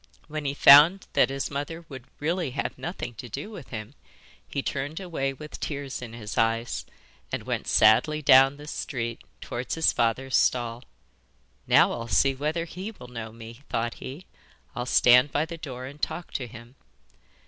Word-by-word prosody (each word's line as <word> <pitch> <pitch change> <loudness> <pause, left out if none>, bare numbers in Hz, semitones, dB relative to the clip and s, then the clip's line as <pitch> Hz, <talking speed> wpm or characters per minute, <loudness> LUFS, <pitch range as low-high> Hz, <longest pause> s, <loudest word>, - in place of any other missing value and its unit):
When 155 -1 -5
he 140 0 -1
found 150 +8 +8
that - - +4
his 135 0 -3
mother 155 +4 -5
would 130 -5 -10
really 165 +1 -1
have - - -2
nothing 170 -8 -6
to 120 +1 -9
do 140 - -6
with 170 - -9
him 110 +3 -7 0.5
he 140 - -3
turned 145 +4 -3
away 165 -8 -2
with 150 +3 -10
tears 140 -3 -4
in 115 -2 -8
his 110 -2 -5
eyes, 115 +1 0 0.4
and - - -3
went - - -3
sadly 130 +8 +4
down 135 -1 +6
the 145 - -11
street 120 -6 -4 0.2
towards 125 +1 -4
his 160 -1 +3
father's 130 +3 0
stall. 120 -1 +1 0.8
'Now - - +5
I'll 115 - -4
see 135 +5 +3
whether 155 +5 -2
he 185 +5 -7
will 125 - -12
know 115 -2 -7
me,' 115 +2 -11
thought 115 +1 -1
he. 145 +8 -9 0.5
'I'll 120 +1 -3
stand 125 +3 +5
by 150 - +1
the 165 +1 -8
door 130 -5 -7
and 145 +3 -10
talk 175 - -3
to 125 - -3
him. 115 +1 -12
135 Hz, 175 wpm, -26 LUFS, 120-150 Hz, 0.8 s, found